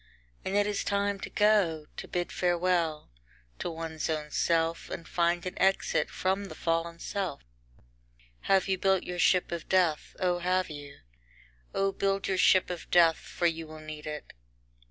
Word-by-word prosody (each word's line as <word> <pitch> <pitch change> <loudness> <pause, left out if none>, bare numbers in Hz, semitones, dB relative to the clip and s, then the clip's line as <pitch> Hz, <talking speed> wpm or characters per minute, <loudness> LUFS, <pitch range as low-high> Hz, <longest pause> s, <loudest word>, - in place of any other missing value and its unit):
And 195 - -2
it 205 0 +4
is 205 -1 -1
time 200 0 0
to - - -6
go, 200 -8 +3
to - - -6
bid 175 -1 -2
farewell 175 - 0 0.5
to - - -2
one's 160 -1 -4
own 150 -1 -2
self, 165 +1 +1
and 165 - -6
find 170 0 +1
an 180 - -3
exit 195 0 +2
from 190 +2 -1
the - - -9
fallen 165 0 -1
self. 185 -3 -3 0.4
II - - -28 0.6
Have 195 -1 +4
you 190 -1 0
built 190 -1 +2
your 180 0 -5
ship 180 0 +3
of 170 -1 -5
death, 175 -5 +2
O 180 -1 +1
have 185 0 0
you? 145 -1 -10 0.7
O 195 0 +2
build 195 0 0
your 190 -1 0
ship 185 -1 +5
of 175 - -7
death, 165 -2 +5
for 175 - -4
you 165 -1 0
will 155 0 -10
need 155 0 -8
it. 150 -1 -6
175 Hz, 175 wpm, -29 LUFS, 165-190 Hz, 0.7 s, ship